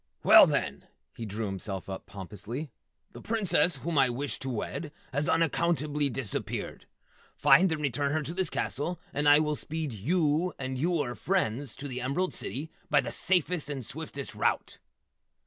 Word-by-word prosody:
"Well, -, -, +9 dB
then," -, -, -2 dB, 0.3 s
he 115 Hz, -, -5 dB
drew 105 Hz, +2 st, -3 dB
himself 95 Hz, -1 st, -4 dB
up 95 Hz, -1 st, -6 dB
pompously. 105 Hz, -, -6 dB, 0.4 s
"The -, -, -10 dB
Princess 185 Hz, -8 st, +1 dB
whom 155 Hz, +2 st, 0 dB
I 135 Hz, -2 st, +5 dB
wish 135 Hz, +4 st, -3 dB
to 135 Hz, -, -4 dB
wed 140 Hz, +6 st, -4 dB, 0.2 s
has 145 Hz, +5 st, 0 dB
unaccountably 155 Hz, -3 st, +1 dB
disappeared. 125 Hz, -4 st, -4 dB, 0.5 s
Find 185 Hz, 0 st, +6 dB
and 160 Hz, -, -1 dB
return 140 Hz, +1 st, 0 dB
her 155 Hz, 0 st, 0 dB
to 155 Hz, +4 st, -4 dB
this 185 Hz, -3 st, 0 dB
castle, 170 Hz, +5 st, -2 dB
and 145 Hz, +1 st, +3 dB
I 145 Hz, -, +9 dB
will 150 Hz, 0 st, +1 dB
speed 155 Hz, -3 st, -4 dB
yew 155 Hz, -, +1 dB
and 130 Hz, -1 st, -3 dB
yewer 145 Hz, -3 st, 0 dB
friends 145 Hz, -, -1 dB
to 145 Hz, -, -6 dB
the 125 Hz, -2 st, -4 dB
Emerald 140 Hz, +9 st, 0 dB
City 150 Hz, +5 st, -6 dB, 0.2 s
by 145 Hz, -2 st, +5 dB
the 120 Hz, -3 st, -5 dB
safest 175 Hz, -2 st, 0 dB
and 135 Hz, -4 st, -4 dB
swiftest 140 Hz, -1 st, -6 dB
route!" -, -, -1 dB
145 Hz, 165 wpm, -29 LUFS, 125-160 Hz, 0.5 s, Well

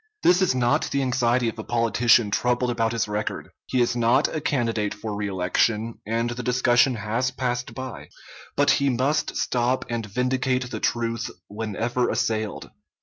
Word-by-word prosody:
This 180 Hz, +1 st, +5 dB
is 185 Hz, -8 st, +2 dB
not 120 Hz, -1 st, +1 dB
the 140 Hz, 0 st, 0 dB
anxiety 125 Hz, -1 st, +1 dB
of 115 Hz, 0 st, -4 dB
a -, -, -4 dB
politician 115 Hz, -1 st, +3 dB
troubled 125 Hz, +2 st, +1 dB
about 115 Hz, -1 st, 0 dB
his 115 Hz, -2 st, -1 dB
record. 105 Hz, 0 st, -4 dB, 0.2 s
He 130 Hz, -, +1 dB
is 120 Hz, 0 st, +1 dB
not 120 Hz, +4 st, +3 dB
a 155 Hz, -, -4 dB
candidate 115 Hz, -8 st, -1 dB
for 105 Hz, 0 st, -5 dB
reelection, 105 Hz, +3 st, 0 dB
and 115 Hz, +2 st, 0 dB
the 120 Hz, +1 st, -4 dB
discussion 125 Hz, +1 st, +3 dB
has 115 Hz, +4 st, -1 dB
passed 125 Hz, -1 st, -3 dB
by; 130 Hz, -2 st, -7 dB, 0.5 s
but -, -, +4 dB
he 140 Hz, 0 st, +2 dB
must 135 Hz, +5 st, 0 dB
stop 125 Hz, +1 st, 0 dB
and 120 Hz, -1 st, -2 dB
vindicate 125 Hz, +2 st, -1 dB
the 110 Hz, -, -4 dB
truth 115 Hz, 0 st, -1 dB, 0.2 s
whenever 110 Hz, +4 st, -2 dB
assailed. 110 Hz, -2 st, -2 dB
120 Hz, 160 wpm, -24 LUFS, 115-125 Hz, 0.5 s, This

